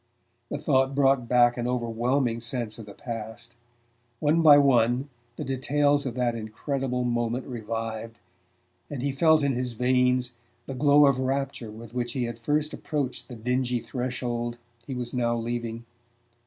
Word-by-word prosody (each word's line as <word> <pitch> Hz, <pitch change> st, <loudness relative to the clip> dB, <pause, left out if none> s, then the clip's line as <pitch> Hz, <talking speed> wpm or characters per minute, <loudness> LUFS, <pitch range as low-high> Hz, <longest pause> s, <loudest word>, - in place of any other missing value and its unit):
The -, -, -3 dB
thought 135 Hz, -2 st, +2 dB
brought 135 Hz, -3 st, +3 dB
back 120 Hz, -1 st, +4 dB
an 120 Hz, 0 st, -1 dB
overwhelming 120 Hz, 0 st, 0 dB
sense 115 Hz, -2 st, -2 dB
of 110 Hz, -, -9 dB
the 100 Hz, -, -11 dB
past. 115 Hz, 0 st, -7 dB, 0.7 s
One 155 Hz, +2 st, +3 dB
by 150 Hz, -3 st, +9 dB
one 130 Hz, -1 st, +3 dB, 0.3 s
the -, -, -5 dB
details 145 Hz, +2 st, +1 dB
of 120 Hz, -, -4 dB
that 125 Hz, -2 st, +1 dB
incredible 125 Hz, +3 st, -3 dB
moment 120 Hz, +1 st, -1 dB
revived, 115 Hz, -1 st, -5 dB, 0.7 s
and 135 Hz, -4 st, -5 dB
he 140 Hz, -, +1 dB
felt 160 Hz, +2 st, +4 dB
in 140 Hz, -1 st, +2 dB
his 125 Hz, 0 st, -2 dB
veins 125 Hz, +1 st, +2 dB, 0.3 s
the 135 Hz, -, -5 dB
glow 145 Hz, +2 st, +5 dB
of 135 Hz, -2 st, +3 dB
rapture 135 Hz, -3 st, -2 dB
with 110 Hz, +1 st, -11 dB
which 120 Hz, -1 st, -2 dB
he 130 Hz, -, -1 dB
had 120 Hz, -1 st, -4 dB
first 150 Hz, +5 st, 0 dB
approached 140 Hz, -5 st, -3 dB
the 125 Hz, -, -8 dB
dingy 125 Hz, +2 st, 0 dB
threshold 120 Hz, -1 st, -3 dB, 0.3 s
he 135 Hz, -, -4 dB
was 120 Hz, -1 st, -3 dB
now 120 Hz, -2 st, +1 dB
leaving. 115 Hz, 0 st, -4 dB
125 Hz, 155 wpm, -26 LUFS, 120-135 Hz, 0.7 s, by